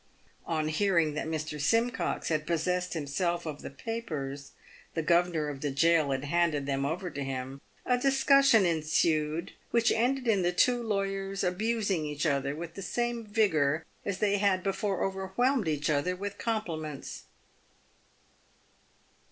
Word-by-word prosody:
On 155 -2 0
hearing 165 -2 +2
that 150 - -3
Mr. 155 -2 -3
Simcox 230 - +1
had 155 -1 -1
possessed 180 +2 0
himself 170 +3 -1
of 150 -2 -5
the - - -6
papers 145 - -5 0.2
— - - -23
the 165 - 0
governor 170 -1 +2
of 140 -2 -6
the 145 - -1
gaol 155 +2 +3
had 135 0 -1
handed 150 -1 +1
them 140 0 0
over 180 +4 -3
to 140 - -4
him 135 0 -5
— - - -33
a 250 -1 +2
discussion 270 -4 +5
ensued, 155 -1 +1 0.2
which 235 0 +3
ended 250 +3 +1
in 205 -4 +3
the 175 0 +2
two 240 +7 +3
lawyers 195 -2 -2
abusing 200 -1 0
each 150 +1 -3
other 140 -2 0
with 165 +1 -7
the 195 - -7
same 240 +2 -2
vigour 160 -8 +2 0.2
as 200 -2 -2
they 205 0 +2
had 190 -2 +2
before 195 0 -1
overwhelmed 195 +5 0
each 150 -1 0
other 155 +4 +1
with 200 +2 -6
compliments. 165 - -4
175 Hz, 150 wpm, -29 LUFS, 150-205 Hz, 0.2 s, discussion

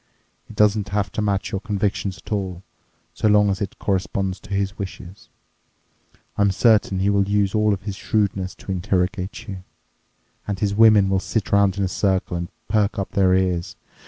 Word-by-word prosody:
It - - -11
doesn't 105 -1 +2
have 100 0 -1
to - - -3
match 100 -2 -1
your 95 - -3
convictions 100 -2 -2
at - - -15
all, 95 -3 -3 0.5
so - - 0
long 105 -1 +4
as 95 - -3
it 100 - -4
corresponds 95 -1 -1
to 105 - -16
his 100 -1 -1
wishes. 95 -1 -8 1.1
I'm 100 0 +4
certain 105 -1 +3
he 100 +2 +2
will 100 -1 +1
use 100 -1 +1
all 105 -1 +2
his 100 +1 -7
shrewdness 100 -3 -1
to - - -8
interrogate 90 +2 -2
you. 95 -3 -7 0.8
And 100 - -2
his 100 +1 0
women 110 -2 +6
will 95 0 +1
sit 100 +1 -3
around 100 -1 +3
in 100 - 0
a - - +1
circle 95 -1 0
and 85 +1 -4 0.2
perk 105 0 +1
up 100 - -3
their 95 -2 +3
ears. 90 -2 -1
100 Hz, 180 wpm, -22 LUFS, 95-105 Hz, 1.1 s, women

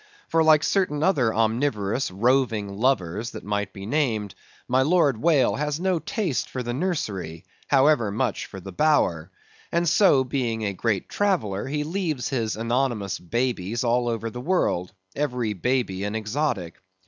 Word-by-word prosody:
For 165 - +3
like 155 -1 +5
certain 155 -7 +1
other 140 -12 +3
omnivorous 110 0 0
roving 110 -1 +1
lovers 115 -4 0
that - - -8
might 105 0 -2
be 95 +1 -9
named, 110 - 0 0.3
my 130 +1 +3
Lord 145 -5 +2
Whale 155 -5 +3
has 150 +1 -2
no 185 -1 +1
taste 200 - -2
for 130 - -4
the 120 0 -3
nursery, 105 - -3 0.2
however 135 -5 +4
much 110 +2 -2
for 95 - -9
the 95 +1 -9
bower; 90 - +2 0.4
and 170 0 +1
so, 160 -5 +5
being 120 -4 -2
a 100 - -1
great 100 -1 -1
traveller, 150 - 0
he 150 +2 -1
leaves 160 -5 -2
his 115 -5 -1
anonymous 115 -3 -1
babies 115 +2 -2
all 120 0 +1
over 115 -1 -3
the 125 - -6
world; 125 - 0 0.2
every 125 -7 -1
baby 105 -2 -1
an 105 +1 -3
exotic. 110 - -2
120 Hz, 155 wpm, -24 LUFS, 105-150 Hz, 0.4 s, like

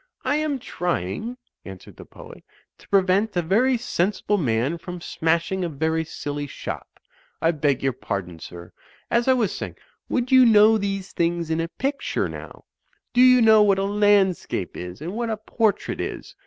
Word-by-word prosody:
"I 290 - +1
am 305 -2 -1
trying," 175 - -3 0.3
answered 95 -1 -11
the - - -11
poet, - - -13 0.4
"to - - -20
prevent 195 +1 +2
a 175 - +1
very 240 +9 +2
sensible 205 -1 -1
man 130 +3 0
from 180 0 -7
smashing 170 +3 -1
a 175 - -1
very 160 +2 -1
silly 145 -2 -5
shop. - - -8 0.4
I 165 - +2
beg 145 -5 0
your 135 -1 +1
pardon, 90 -7 -5
sir. 85 +1 -11 0.4
As 235 +1 +2
I 260 - +6
was 230 -7 0
saying, - - -6 0.3
would 250 0 -1
you 260 -1 +8
know 220 -1 +6
these 195 -1 -3
things 170 -1 -1
in 160 +1 0
a 165 - -2
picture, 275 +10 -2
now? - - -10 0.5
Do 245 - +4
you 255 -1 +7
know 220 -1 +7
what 200 -2 +4
a 195 - 0
landscape 200 - +1
is 90 +6 -8
and 170 +4 -5
what 235 +1 -2
a 220 - -2
portrait 215 -1 -1
is? - - -6
190 Hz, 175 wpm, -23 LUFS, 160-220 Hz, 0.5 s, you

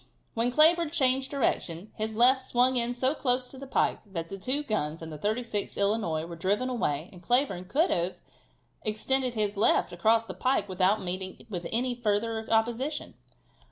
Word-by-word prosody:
When 235 +2 0
Cleburne 325 +4 +5
changed 265 -4 +1
direction 205 - -1
his 215 0 -4
left 250 +4 +5
swung 250 +1 +3
in 240 0 +1
so 260 +3 +1
close 250 -3 -1
to 265 - -10
the 275 - -9
pike - - +1
that 170 -5 -6
the 195 - -6
two 260 +9 0
guns 165 - -2
and 160 - -7
the - - -7
36th 215 +1 -3
Illinois 200 -6 0
were 170 0 -8
driven 200 +9 -1
away 170 - -1
and 180 - -13
Cleburne 240 -3 +1
could 310 - +1
then 170 - +2
have 185 - -6 0.7
extended 250 +4 +1
his 210 -1 -1
left 205 - +3
across 225 +1 +3
the 225 - -7
pike 255 -4 0
without 190 +2 +1
meeting 185 +2 -4
with 175 -3 -4
any 245 +2 +1
further 225 -1 -2
opposition. 240 +7 -1
225 Hz, 180 wpm, -28 LUFS, 190-255 Hz, 0.7 s, Cleburne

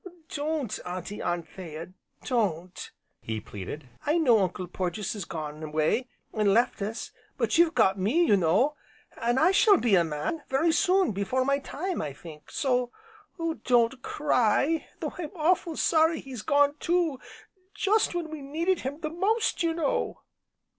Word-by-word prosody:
"Don't, 295 -5 -2
Auntie 180 +3 -5
Anthea, 175 -1 -5 0.3
don't!" 185 -7 -1 0.3
he 110 -1 -3
pleaded. 105 +8 -8 0.2
"I 300 +3 +2
know 250 -9 +5
Uncle 185 -1 -1
Porges 180 +3 -3
has 205 -5 -5
gone 155 -2 -6
away, 155 +11 0 0.3
an' 210 -2 +3
left 235 -2 +2
us, 215 +3 -4 0.3
but - - +1
you've 340 -1 +4
got 190 +1 +3
me 225 - +2
left, 340 - +3
you 205 - +6
know, 190 - +2 0.5
an' 240 +2 +1
I 330 +6 +5
shall 410 0 +6
be 235 -4 +1
a 175 -3 +6
man 160 - -3
very 295 +5 +3
soon, 370 0 +3
before 210 +6 0
my 275 +1 +2
time, 350 +6 -4
I 145 -2 -4
think. 150 +1 -12
So 250 -3 0 0.7
don't 245 0 +3
cry, 285 +3 +1
though - - -4
I'm 340 +1 -5
awful' 335 0 +1
sorry 320 0 +3
he's 260 -5 -7
gone, 285 +2 +3
too 335 -6 +1 0.6
just 420 -2 +2
when 335 -3 -3
we 310 -2 -6
needed 330 +7 0
him 280 +5 -5
the 310 -1 -3
most, 415 +7 +1
you 330 -1 +1
know!" 315 -5 -1
255 Hz, 160 wpm, -27 LUFS, -, 0.7 s, you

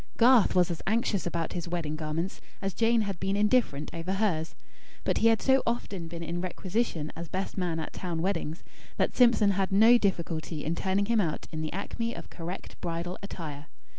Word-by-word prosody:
Garth 240 -4 +6
was 180 -1 +4
as 170 - -4
anxious 215 -3 +1
about 170 -1 -2
his 175 -1 -4
wedding 170 -3 -2
garments, 160 +4 -3 0.2
as 195 -1 -2
Jane 230 0 +3
had 200 -4 -3
been 195 +1 0
indifferent 210 - +2
over 170 +3 -3
hers; 185 -6 0 0.5
but - - +1
he 230 - +5
had 225 -1 +3
so 265 0 +5
often 200 -7 -2
been 170 0 -6
in 170 +1 -3
requisition 185 -3 -2
as 170 +1 -6
best 190 +1 -3
man 175 -4 -1
at 160 - -5
town 175 -3 -3
weddings, 165 -3 -2 0.3
that - - +1
Simpson 235 -5 +5
had 195 0 0
no 225 +5 +7
difficulty 170 -5 -1
in 160 - 0
turning 190 +3 +1
him 225 0 +3
out 160 -5 -2
in 155 -1 -4
the 155 - -3
acme 230 +4 -3
of - - -9
correct 175 +2 -7
bridal 170 +1 -3
attire. 155 -7 -7
185 Hz, 195 wpm, -29 LUFS, 165-210 Hz, 0.5 s, no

